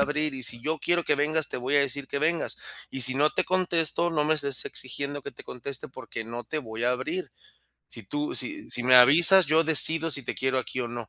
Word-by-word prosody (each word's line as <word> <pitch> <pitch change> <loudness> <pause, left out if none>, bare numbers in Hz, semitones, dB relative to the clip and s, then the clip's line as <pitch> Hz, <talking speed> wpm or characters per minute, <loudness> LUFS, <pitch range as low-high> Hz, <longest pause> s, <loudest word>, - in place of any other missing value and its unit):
abrir, 150 0 -1
y 130 - -8
si 120 -1 -2
yo 155 +4 -3
quiero 175 0 0
que - - +1
vengas, 150 +1 0
te - - -6
voy 130 +4 -1
a - - +5
decir 140 0 -3
que 140 - -3
vengas, 165 +3 -1 0.3
y 135 -1 -2
si 130 +1 +4
no 150 +3 +2
te - - -1
contesto, 175 -2 0
no 150 -3 0
me 155 - +2
estés 140 -3 0
exigiendo 140 +3 -3
que - - -7
te - - -13
conteste 130 +3 -4
porque 115 -3 -8
no 120 +1 -7
te 155 - -5
voy 115 -5 -7
a 125 - +2
abrir. 335 - -4 0.6
Si - - -9
tú 300 +3 -4
si 305 0 -4
si 120 - -2
me 130 0 +5
avisas, 165 +8 +6
yo 160 +2 +2
decido 160 +1 +6
si 140 - -1
te - - -5
quiero 130 0 -1
aquí 130 0 -5
o 120 - -3
no, 120 -2 -7
145 Hz, 245 wpm, -25 LUFS, 130-160 Hz, 0.6 s, avisas